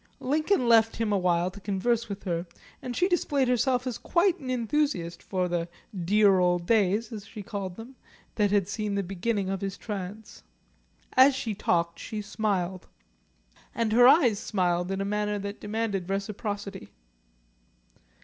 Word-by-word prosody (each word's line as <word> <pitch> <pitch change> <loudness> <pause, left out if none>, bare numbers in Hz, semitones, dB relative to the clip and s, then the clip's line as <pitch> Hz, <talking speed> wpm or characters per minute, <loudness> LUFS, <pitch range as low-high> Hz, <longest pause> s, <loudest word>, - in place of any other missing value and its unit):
Lincoln 305 +1 +1
left 225 -1 +5
him 225 -2 0
awhile 180 -2 +1
to 200 - -11
converse 220 +4 0
with 200 0 -6
her, 175 -2 -2 0.3
and 250 -1 -5
she 360 - +2
displayed 290 -7 +1
herself 250 +1 +1
as 250 -3 -3
quite 360 +1 +2
an 265 -4 -7
enthusiast 240 - -1
for 185 -2 -1
the 170 -1 -2 0.2
"dear 195 +1 +3
old 175 -1 +2
days," 215 +2 +2
as 210 -3 -7
she 210 -3 -8
called 195 -3 -5
them, 235 +5 -11 0.4
that 205 -2 +2
had 200 -2 +2
seen 210 -1 -3
the 200 - 0
beginning 195 +2 -2
of 195 0 -3
his 195 -1 -4
trance. 205 0 -7 0.7
As 260 +1 +6
she 230 -4 -3
talked 170 -4 0
she 215 - -5
smiled, 200 -3 -2 0.9
and 230 -2 0
her 245 +2 +7
eyes 255 -8 +5
smiled 180 -3 0
in 195 0 -2
a - - -1
manner 210 0 -1
that 200 +1 -6
demanded 210 -4 -2
reciprocity. 200 0 -4
205 Hz, 160 wpm, -27 LUFS, 190-235 Hz, 0.9 s, her